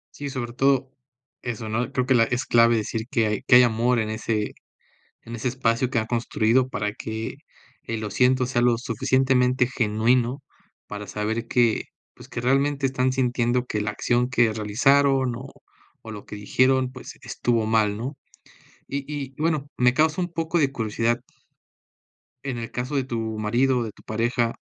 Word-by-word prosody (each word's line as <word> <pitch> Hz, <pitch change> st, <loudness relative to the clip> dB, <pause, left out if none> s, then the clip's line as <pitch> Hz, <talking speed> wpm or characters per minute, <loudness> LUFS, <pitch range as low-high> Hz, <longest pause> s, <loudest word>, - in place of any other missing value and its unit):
Sí, 145 Hz, -1 st, -5 dB
sobre 120 Hz, -3 st, -4 dB
todo 135 Hz, 0 st, +2 dB, 0.5 s
eso, 115 Hz, -2 st, -4 dB
¿no?, 120 Hz, +3 st, -2 dB
creo 125 Hz, -, 0 dB
que 130 Hz, -, +3 dB
la 115 Hz, -2 st, +5 dB
es 125 Hz, +2 st, -2 dB
clave 115 Hz, 0 st, +4 dB
decir 110 Hz, +1 st, -3 dB
que 115 Hz, -2 st, +2 dB
hay 105 Hz, +4 st, -1 dB
que 130 Hz, -2 st, +6 dB
hay 125 Hz, -, +9 dB
amor 120 Hz, +1 st, +2 dB
en 110 Hz, 0 st, -2 dB
ese 110 Hz, -1 st, -2 dB, 0.7 s
en 115 Hz, +1 st, -7 dB
ese 120 Hz, +2 st, -3 dB
espacio 120 Hz, 0 st, 0 dB
que 120 Hz, -3 st, +1 dB
ha 110 Hz, -, -3 dB
construido 120 Hz, +1 st, +1 dB
para 105 Hz, -2 st, -2 dB
que 110 Hz, 0 st, -5 dB, 0.5 s
el 115 Hz, -1 st, -4 dB
"lo 105 Hz, -, -3 dB
siento" 125 Hz, +4 st, +3 dB
sea 120 Hz, -1 st, 0 dB
lo 120 Hz, -1 st, +3 dB
suficientemente 125 Hz, +1 st, +2 dB
genuino 120 Hz, +3 st, +1 dB, 0.5 s
para 105 Hz, -1 st, -7 dB
saber 110 Hz, +3 st, -3 dB
que, 120 Hz, -3 st, +2 dB, 0.3 s
pues, -, -, -14 dB
que -, -, -5 dB
realmente 135 Hz, +2 st, +1 dB
están 130 Hz, -1 st, +1 dB
sintiendo 125 Hz, -1 st, 0 dB
que 105 Hz, -4 st, -2 dB
la 105 Hz, -1 st, -1 dB
acción 120 Hz, +3 st, 0 dB
que 120 Hz, -3 st, +3 dB
realizaron 130 Hz, +4 st, +2 dB
o 135 Hz, +3 st, -8 dB, 0.5 s
o 110 Hz, -, -9 dB
lo 105 Hz, -2 st, -9 dB
que 105 Hz, -, -8 dB
dijeron, 130 Hz, +5 st, +2 dB
pues, 130 Hz, -, -10 dB
estuvo 115 Hz, -2 st, 0 dB
mal, 110 Hz, -2 st, +2 dB
¿no? 130 Hz, +6 st, -5 dB, 0.7 s
Y 140 Hz, -, -2 dB
y 135 Hz, -2 st, -5 dB
y, -, -, -6 dB
bueno, 155 Hz, -3 st, 0 dB
me 125 Hz, 0 st, +4 dB
causa 160 Hz, +3 st, +2 dB
un 175 Hz, -1 st, -3 dB
poco 165 Hz, +1 st, -1 dB
de 135 Hz, -3 st, +2 dB
curiosidad 115 Hz, 0 st, -1 dB, 1.3 s
en 130 Hz, -3 st, -3 dB
el 115 Hz, -, -5 dB
caso 125 Hz, +4 st, -3 dB
de 135 Hz, -, +1 dB
tu 120 Hz, -3 st, -4 dB, 0.2 s
marido 125 Hz, +5 st, +2 dB
o 120 Hz, -, -1 dB
de 110 Hz, -, -6 dB
tu -, -, -20 dB
pareja, 115 Hz, +1 st, -1 dB
120 Hz, 180 wpm, -24 LUFS, 115-130 Hz, 1.3 s, hay